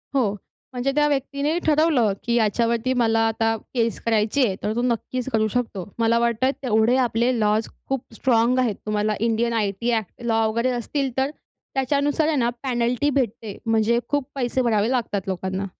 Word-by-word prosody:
हो. 235 Hz, -7 st, +2 dB, 0.4 s
म्हणजे 250 Hz, +2 st, -1 dB
त्या 295 Hz, 0 st, +4 dB
व्यक्तीने 280 Hz, +3 st, -1 dB
ठरवलं, 300 Hz, -8 st, +3 dB
की 235 Hz, -, -1 dB
याच्यावरती 235 Hz, +2 st, +1 dB
मला 225 Hz, -1 st, +2 dB
आता 225 Hz, 0 st, +1 dB, 0.2 s
केस 230 Hz, -2 st, 0 dB
करायची 225 Hz, +4 st, +2 dB
आहे, 195 Hz, -, -1 dB
तर 210 Hz, -, 0 dB
तो 240 Hz, -, 0 dB
नक्कीच 250 Hz, +1 st, -2 dB
करू 220 Hz, 0 st, +2 dB
शकतो. 215 Hz, -5 st, -3 dB
मला 230 Hz, +1 st, +3 dB
वाटतं, 235 Hz, +2 st, +1 dB
तेवढे 225 Hz, 0 st, +3 dB
आपले 240 Hz, 0 st, +2 dB
लॉज 215 Hz, +1 st, +1 dB, 0.2 s
खूप 270 Hz, -2 st, -1 dB
स्ट्राँग 245 Hz, +1 st, +2 dB
आहेत. 235 Hz, -5 st, +1 dB
तुम्हाला 215 Hz, 0 st, 0 dB
इंडियन 230 Hz, +1 st, +1 dB
आयटी 215 Hz, +1 st, 0 dB
ॲक्ट 220 Hz, 0 st, -3 dB
लॉ 225 Hz, -1 st, +2 dB
वगैरे 235 Hz, +3 st, 0 dB
असतील, 265 Hz, +3 st, -2 dB
तर 265 Hz, +1 st, +2 dB, 0.5 s
त्याच्यानुसार 285 Hz, +3 st, +1 dB
आहे 315 Hz, -, +1 dB
ना 240 Hz, -1 st, +2 dB
पॅनल्टी 250 Hz, +2 st, 0 dB
भेटते, 230 Hz, -6 st, -2 dB
म्हणजे 225 Hz, +1 st, +2 dB
खूप 285 Hz, -3 st, 0 dB
पैसे 260 Hz, 0 st, 0 dB
भरावे 220 Hz, -2 st, +2 dB
लागतात 230 Hz, -6 st, -1 dB
लोकांना. 190 Hz, +1 st, -3 dB
235 Hz, 165 wpm, -23 LUFS, 220-260 Hz, 0.5 s, त्या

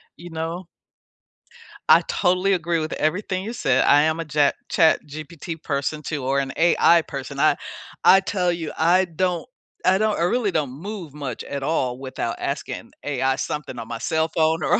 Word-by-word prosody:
You 175 Hz, 0 st, -11 dB
know 165 Hz, +2 st, -4 dB, 1.2 s
I -, -, +8 dB
totally 185 Hz, +1 st, +2 dB
agree 170 Hz, -1 st, 0 dB
with 155 Hz, 0 st, -3 dB
everything 185 Hz, +4 st, -1 dB
you 230 Hz, -, -4 dB
said. 135 Hz, -, +2 dB
I 145 Hz, -, +6 dB
am 160 Hz, +1 st, +1 dB
a 165 Hz, -, -3 dB
ja 145 Hz, -2 st, +4 dB, 0.2 s
ChatGPT 160 Hz, +1 st, 0 dB
person, 145 Hz, +1 st, -2 dB
too, 145 Hz, -3 st, -4 dB
or 135 Hz, +1 st, +1 dB
an 135 Hz, -1 st, -2 dB
AI 170 Hz, 0 st, +5 dB
person. 140 Hz, -3 st, -7 dB
I -, -, +4 dB, 0.5 s
I 190 Hz, -, +8 dB
tell 185 Hz, -2 st, 0 dB
you, 165 Hz, -3 st, -4 dB
I 175 Hz, +4 st, +4 dB
don't 175 Hz, 0 st, -2 dB, 0.4 s
I 185 Hz, +1 st, +5 dB
don't 215 Hz, +1 st, +1 dB
I 170 Hz, -, +1 dB
really 210 Hz, +2 st, +1 dB
don't 145 Hz, -6 st, -1 dB
move 175 Hz, +1 st, -7 dB
much 140 Hz, -5 st, -5 dB
at 140 Hz, -1 st, -5 dB
all 130 Hz, -5 st, 0 dB
without 130 Hz, 0 st, -4 dB
asking -, -, -4 dB
AI 135 Hz, -2 st, 0 dB
something 145 Hz, -5 st, -4 dB
on 115 Hz, -, -7 dB
my 115 Hz, -1 st, -5 dB
cell 160 Hz, 0 st, 0 dB
phone 160 Hz, 0 st, +1 dB
or -, -, +3 dB
160 Hz, 180 wpm, -23 LUFS, 140-180 Hz, 1.2 s, I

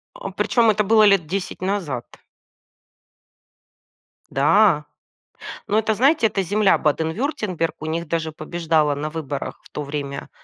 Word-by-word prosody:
А -, -, -6 dB
причём 230 Hz, -2 st, +2 dB
это 210 Hz, 0 st, +2 dB
было 215 Hz, +1 st, +5 dB
лет 195 Hz, -6 st, +4 dB
10 185 Hz, 0 st, -4 dB
назад. 175 Hz, -11 st, -2 dB, 2.2 s
Да. 150 Hz, +2 st, +3 dB, 0.8 s
Но 215 Hz, +1 st, +2 dB
это, 220 Hz, 0 st, 0 dB
знаете, 260 Hz, +1 st, +3 dB
это 195 Hz, -2 st, -2 dB
земля 205 Hz, +2 st, +3 dB
Баден-Вюртемберг, 165 Hz, -, -1 dB
у 155 Hz, -, -7 dB
них 165 Hz, +1 st, -3 dB
даже 160 Hz, 0 st, -2 dB
побеждала 155 Hz, -2 st, 0 dB
на 150 Hz, +2 st, -4 dB
выборах 150 Hz, -3 st, -5 dB
в -, -, -19 dB
то 150 Hz, -, -5 dB
время 140 Hz, -1 st, -5 dB
170 Hz, 130 wpm, -22 LUFS, 150-210 Hz, 2.2 s, было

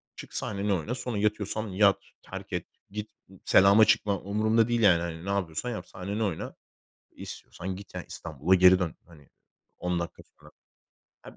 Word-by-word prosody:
Çık -, -, -11 dB
sahneni 100 Hz, -1 st, -1 dB
oyna. 100 Hz, +8 st, -2 dB
Sonra 125 Hz, -3 st, -4 dB
yatıyorsan 105 Hz, +1 st, -1 dB
yat, 100 Hz, +1 st, +4 dB, 0.2 s
terk -, -, -9 dB
et. -, -, -2 dB, 0.3 s
Git, 105 Hz, +1 st, -6 dB, 0.3 s
selama 100 Hz, +3 st, +7 dB
çıkma. 105 Hz, -2 st, +2 dB
Umurumda 110 Hz, +3 st, +2 dB
değil, 120 Hz, -1 st, +1 dB
yani, 85 Hz, -5 st, +5 dB
hani. 85 Hz, 0 st, -5 dB
Ne -, -, -4 dB
yapıyorsan 100 Hz, +3 st, -1 dB
yap, 90 Hz, -6 st, -5 dB
sahnenin 100 Hz, +4 st, -5 dB
oyna. 100 Hz, -7 st, -2 dB, 0.6 s
İstiyorsan 90 Hz, +2 st, -7 dB
git 100 Hz, +2 st, -12 dB
yani -, -, -5 dB
İstanbul'a 80 Hz, +3 st, 0 dB
geri 90 Hz, 0 st, +7 dB
dön. 90 Hz, -4 st, -2 dB
Hani, 75 Hz, -5 st, -18 dB, 0.5 s
10 90 Hz, -1 st, -1 dB
dakika 85 Hz, -, -6 dB
sonra. -, -, -20 dB, 0.7 s
Ha -, -, -13 dB
100 Hz, 165 wpm, -28 LUFS, 90-105 Hz, 0.7 s, selama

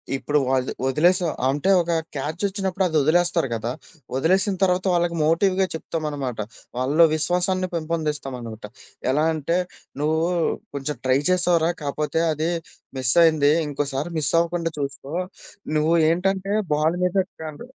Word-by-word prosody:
ఇప్పుడు 145 Hz, +2 st, 0 dB
వాల్ 130 Hz, -1 st, +1 dB, 0.2 s
వదిలేసావు 170 Hz, +5 st, +3 dB, 0.2 s
అంటే, 145 Hz, +7 st, 0 dB
ఒక 170 Hz, 0 st, -2 dB, 0.2 s
క్యాచొచ్చినప్పుడు 190 Hz, +6 st, -2 dB
అది 160 Hz, -, -4 dB
వదిలేస్తారు 170 Hz, +1 st, +2 dB
కదా! 115 Hz, +1 st, -2 dB, 0.4 s
వదిలేసిన 190 Hz, +8 st, +2 dB
తర్వాత 185 Hz, 0 st, +2 dB
వాళ్ళకి 170 Hz, -1 st, +1 dB
మోటివ్‌గా 185 Hz, +4 st, +2 dB
చెప్తామనమాట. 150 Hz, -7 st, -4 dB, 0.4 s
వాళ్ళలో 145 Hz, +6 st, +3 dB
విశ్వాసాన్ని 180 Hz, +3 st, +1 dB
పెంపొందిస్తామనమాట. 145 Hz, -9 st, -4 dB, 0.5 s
ఎలా 150 Hz, +4 st, +2 dB
అంటే, 160 Hz, +2 st, -1 dB, 0.4 s
నువ్వు 155 Hz, +1 st, +1 dB, 0.6 s
కొంచెం 140 Hz, +1 st, -3 dB
ట్రై 130 Hz, +1 st, +3 dB
చేశావురా 175 Hz, -2 st, +3 dB
కాపోతే 150 Hz, +3 st, -1 dB
అది 155 Hz, +2 st, -1 dB, 0.5 s
మిసైయింది. 145 Hz, +3 st, +4 dB, 0.2 s
ఇంకోసారి 145 Hz, +2 st, -3 dB
మిస్సవ్వకుండా 165 Hz, +3 st, +1 dB
చూసుకో, 140 Hz, +1 st, -5 dB, 0.6 s
నువ్వు 155 Hz, +2 st, +2 dB, 0.2 s
ఏంటంటే 195 Hz, +3 st, 0 dB, 0.2 s
బాల్ 155 Hz, +3 st, +1 dB
మీద 180 Hz, +1 st, -1 dB, 0.3 s
కన్ 155 Hz, -2 st, -8 dB
160 Hz, 115 wpm, -23 LUFS, 145-175 Hz, 0.6 s, మిసైయింది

